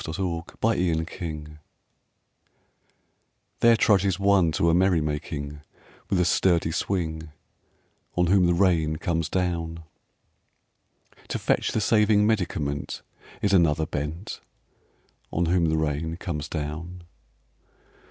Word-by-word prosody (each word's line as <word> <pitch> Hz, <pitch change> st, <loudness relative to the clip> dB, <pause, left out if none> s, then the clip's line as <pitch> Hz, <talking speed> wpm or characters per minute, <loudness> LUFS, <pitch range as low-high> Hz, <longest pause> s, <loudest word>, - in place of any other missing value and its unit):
AN -, -, -6 dB
AUTUMN 85 Hz, -1 st, -4 dB
RAIN 90 Hz, -7 st, +1 dB
SCENE 75 Hz, -3 st, -7 dB, 2.0 s
THERE 115 Hz, 0 st, +6 dB
trudges 100 Hz, -4 st, +2 dB
one 100 Hz, -4 st, +4 dB
to 85 Hz, +1 st, +2 dB
a -, -, +2 dB
merry 90 Hz, -1 st, +3 dB
making 75 Hz, -1 st, -4 dB, 0.5 s
With 95 Hz, -, +1 dB
a 90 Hz, -, +3 dB
sturdy 85 Hz, -2 st, +2 dB
swing, 80 Hz, -3 st, -2 dB, 0.9 s
On 90 Hz, -, +3 dB
whom 90 Hz, 0 st, +4 dB
the 85 Hz, -, +2 dB
rain 85 Hz, -4 st, +2 dB
comes 80 Hz, 0 st, -2 dB
down. 85 Hz, -3 st, -2 dB, 1.4 s
To -, -, -2 dB
fetch -, -, 0 dB
the 110 Hz, -, 0 dB
saving 105 Hz, -1 st, +4 dB
medicament 80 Hz, -9 st, -2 dB, 0.4 s
Is 100 Hz, -1 st, +2 dB
another 80 Hz, -4 st, +3 dB
bent, 75 Hz, +5 st, -5 dB, 0.9 s
On 85 Hz, -, 0 dB
whom 85 Hz, 0 st, +2 dB
the 80 Hz, -1 st, +1 dB
rain 80 Hz, +2 st, -2 dB
comes 75 Hz, -5 st, -4 dB
down. 80 Hz, +3 st, -5 dB
85 Hz, 115 wpm, -25 LUFS, 80-95 Hz, 2.0 s, THERE